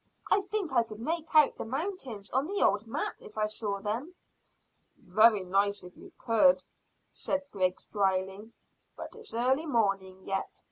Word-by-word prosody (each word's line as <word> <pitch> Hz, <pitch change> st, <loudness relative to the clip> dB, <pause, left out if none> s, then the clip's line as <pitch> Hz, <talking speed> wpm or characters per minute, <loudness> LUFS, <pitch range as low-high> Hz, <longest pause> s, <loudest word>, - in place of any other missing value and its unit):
I 400 Hz, -, +5 dB
think 390 Hz, -6 st, -3 dB
I 240 Hz, -, +5 dB
could 215 Hz, -2 st, -8 dB
make 320 Hz, +6 st, -2 dB
out 305 Hz, -2 st, +6 dB
the -, -, -2 dB
mountains 265 Hz, -, -5 dB
on 265 Hz, +4 st, +1 dB
the 400 Hz, +2 st, 0 dB
old 205 Hz, +3 st, +1 dB
map 225 Hz, -, -3 dB
if 210 Hz, -, -14 dB
I 215 Hz, -, +2 dB
saw 210 Hz, -1 st, -3 dB
them." 235 Hz, -, -4 dB, 0.8 s
"Very 215 Hz, +1 st, +4 dB
nice 200 Hz, +2 st, +1 dB
if 180 Hz, 0 st, -12 dB
you -, -, -14 dB
could," 235 Hz, +4 st, +4 dB, 0.5 s
said 285 Hz, 0 st, -2 dB
Griggs 185 Hz, -2 st, -1 dB
dryly. 195 Hz, +1 st, -1 dB, 0.5 s
"But -, -, -8 dB
it's 455 Hz, -, -9 dB
early 260 Hz, +7 st, +1 dB
morning 195 Hz, -7 st, 0 dB
yet. 195 Hz, 0 st, -3 dB
225 Hz, 160 wpm, -30 LUFS, 200-285 Hz, 0.8 s, out